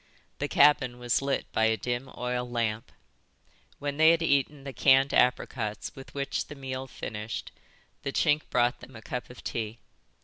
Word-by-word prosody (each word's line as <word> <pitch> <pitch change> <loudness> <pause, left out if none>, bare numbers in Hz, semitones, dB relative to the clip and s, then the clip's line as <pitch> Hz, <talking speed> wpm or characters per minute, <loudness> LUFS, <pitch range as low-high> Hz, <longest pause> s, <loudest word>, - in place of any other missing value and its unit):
The - - -1
cabin 140 -4 +4
was 120 +1 +1
lit 135 -1 -1
by 110 - +2
a 110 0 +2
dim 120 +4 -3
oil 125 0 -2
lamp. 115 -1 -2 0.9
When 145 0 -3
they 160 +1 +7
had 165 0 +4
eaten 140 -1 +1
the 135 -1 -6
canned 135 +1 +4
apricots 120 -3 +1
with 135 +1 -12
which 140 0 -2
the 150 - -9
meal 130 -1 -5
finished 110 -3 -6 0.5
the 135 - -3
Chink 150 +1 +2
brought 120 +1 +2
them 130 0 -13
a 115 - -11
cup 125 - -5
of 125 - -12
tea. 110 0 -3
130 Hz, 170 wpm, -28 LUFS, 120-140 Hz, 0.9 s, they